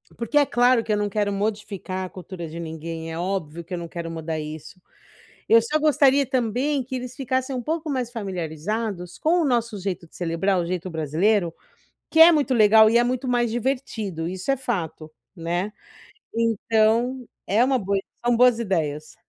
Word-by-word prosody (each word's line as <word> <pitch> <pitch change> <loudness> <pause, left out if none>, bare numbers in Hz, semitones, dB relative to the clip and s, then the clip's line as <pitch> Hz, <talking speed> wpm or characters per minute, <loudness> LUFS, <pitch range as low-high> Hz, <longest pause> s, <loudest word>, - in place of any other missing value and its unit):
porque 235 +5 -1
é 290 - +6
claro 245 -2 +3
que 215 - -1
eu - - +1
não 205 0 -1
quero 205 0 0
modificar 200 -2 -3
a - - -8
cultura 180 -2 -8
de 160 +2 -8
ninguém, 165 0 -6
é 160 - -5
óbvio 170 -3 -3
que 170 - -9
eu - - -1
não 170 - -6
quero 165 0 -6
mudar 160 -1 -4
isso. 155 +4 -8 0.7
Eu 230 0 +6
só 265 +7 0
gostaria 285 -2 +4
também 255 +3 0
que 260 +2 -6
eles 250 0 -6
ficassem 260 0 -2
um 250 - -2
pouco 320 +5 -3
mais 255 -4 -2
familiarizados 190 - -4
com 345 +3 +2
o - - +1
nosso 235 -4 0
jeito 185 -3 -4
de - - -22
celebrar, 180 +3 0
o 175 - -1
jeito 180 +1 -3
brasileiro, 165 +4 +1 0.6
que 320 - 0
é 330 +1 +10
muito 290 -4 +1
legal 220 -1 +6
e 235 - +4
é 240 - +3
muito 255 +1 -2
mais 240 -1 +2
divertido, 225 -8 -2
isso 185 +7 -3
é 275 - +3
fato, 175 - -4 0.3
né. 175 +4 -2 0.6
Então, 230 +2 +1 0.2
é 215 +5 +3
uma 265 +1 +2
boa 200 -3 0 0.2
são 240 -1 +2
boas 245 -1 +5
ideias. 155 -8 -2
215 Hz, 185 wpm, -24 LUFS, 175-245 Hz, 0.7 s, é